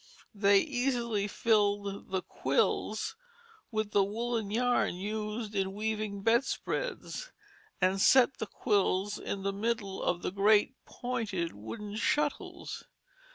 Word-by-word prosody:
They 200 -1 +5
easily 245 -7 0
filled 205 -2 +1
the 190 -1 -1
"quills" 140 +11 0 0.5
with 215 -2 -2
the 200 - +4
woollen 225 +1 -2
yarn 245 -3 +2
used 210 +3 -4
in 195 -1 0
weaving 210 -2 -2
bedspreads 470 - -1 0.5
and 190 +1 +2
set 260 +2 +5
the 220 - -3
quills 205 -2 +1
in 195 -1 -4
the 200 0 0
middle 205 -2 -2
of 175 0 0
the - - -1
great 205 +5 +4
pointed 220 -9 -3
wooden 205 - -7
shuttles. 295 +6 -1
210 Hz, 115 wpm, -31 LUFS, 200-235 Hz, 0.5 s, They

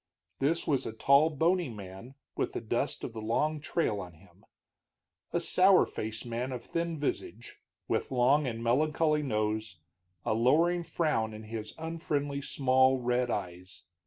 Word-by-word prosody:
This 160 +5 +1
was 140 -5 0
a - - -5
tall, 140 +7 +4
bony 165 +2 +1
man 105 +4 -10 0.2
with - - -2
the - - -2
dust - - -2
of - - -5
the 110 - -6
long 150 +8 0
trail 145 -8 -1
on 90 -3 -8
him; 90 +3 -22 0.9
a - - +1
sour - - +5
faced 110 +2 -5
man 120 +2 -3
of 125 -2 -5
thin 170 -1 -2
visage, 120 -5 -4 0.3
with - - -1
long 135 +3 +3
and 115 -1 -4
melancholy 150 +5 +2
nose, 110 - -2 0.5
a - - +1
lowering 160 +10 +3
frown 150 -11 -1
in 110 - -9
his 110 0 -6
unfriendly, 150 -3 -2
small 130 -1 +3
red 125 0 0
eyes. 90 -2 -5
125 Hz, 155 wpm, -30 LUFS, 110-150 Hz, 0.9 s, sour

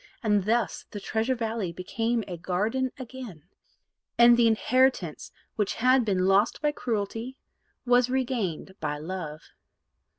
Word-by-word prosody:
And 205 -3 +2
thus 230 0 0
the 205 - -6
Treasure 225 +5 -1
Valley 225 -6 -2
became 225 +6 -2
a 180 - -5
garden 210 +10 -1
again, 250 - -9 0.7
and 235 0 +8
the 235 -1 +4
inheritance 225 - +1 0.3
which 210 -3 0
had 255 +2 +4
been 185 -3 +1
lost 195 +4 +3
by 300 -1 +1
cruelty 230 0 -3 0.5
was 245 0 +4
regained 240 - -2
by 150 -1 -2
love. 155 -1 -6
225 Hz, 130 wpm, -27 LUFS, 190-245 Hz, 0.7 s, and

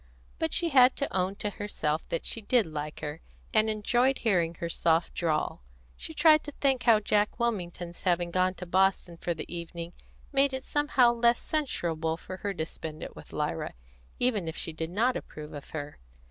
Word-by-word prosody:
But 320 -1 0
she 340 - +1
had 255 -3 +6
to 280 - -3
own 190 +1 +1
to 205 0 -3
herself 160 -7 -2
that 165 - -2
she 230 - -2
did 230 +1 +3
like 150 -1 -5
her, 150 +1 -5 0.3
and 220 0 +4
enjoyed 240 +5 +2
hearing 175 -7 +1
her 170 - -4
soft 165 0 +1
drawl. 155 - -1 0.3
She - - -7
tried 310 -1 +6
to 295 - -5
think 270 -3 +1
how 230 -3 +7
Jack 210 +2 +1
Wilmington's 175 -7 -2
having 175 -1 +1
gone 185 +1 +2
to 180 - -7
Boston 185 -1 +2
for 170 0 -2
the - - -5
evening 170 0 -6 0.4
made 275 -1 +3
it 265 0 -3
somehow 275 -5 +3
less 235 0 +4
censurable 165 - -1
for 185 +2 -8
her 200 +1 -2
to 160 -5 -2
spend 160 -1 -7
it - - -8
with - - -12
Lyra, - - -2 0.4
even 220 -9 +1
if 160 - -4
she 165 - -1
did 160 +1 -4
not 230 +8 +2
approve 150 0 -7
of 145 -2 -8
her. 145 -2 -6
185 Hz, 190 wpm, -29 LUFS, 165-240 Hz, 0.4 s, how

